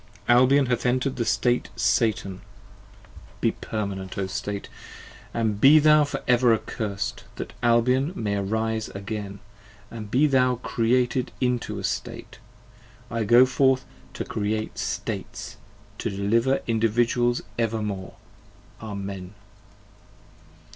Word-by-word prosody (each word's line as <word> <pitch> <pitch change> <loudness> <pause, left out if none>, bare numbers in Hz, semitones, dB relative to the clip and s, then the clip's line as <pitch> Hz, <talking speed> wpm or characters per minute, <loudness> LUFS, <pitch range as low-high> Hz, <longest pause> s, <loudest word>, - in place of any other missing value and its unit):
Albion 130 +3 +5
hath 120 -1 -1
enter'd 130 +2 0
the 115 - 0
State 120 +1 +1
Satan! 110 -4 0 1.0
Be - - +2
permanent 100 -3 -5
O 100 - 0
State! 100 +1 -4 0.6
And 110 -3 -1
be 145 +3 +8
thou 150 0 +6
for 145 - -5
ever 120 -2 +5
accursed! 110 +1 -4
that - - -6
Albion 125 +5 +3
may 105 - -1
arise 110 +2 -1
again. 100 0 -5 0.5
15 115 - -8
And 105 -1 -7
be 130 +7 +3
thou 130 -3 +3
created 125 +1 0
into 125 -1 -1
a - - -6
State! - - -4 0.7
I 115 -1 -1
go 120 +4 +7
forth 130 0 +2 0.3
to - - -4
Create 110 +1 -3
States! - - -4 0.4
to - - -2
deliver 115 +7 +1
Individuals 120 +2 +1 0.2
evermore! 105 -4 -2 0.7
Amen. 100 -3 -6
115 Hz, 115 wpm, -25 LUFS, 105-125 Hz, 1.0 s, be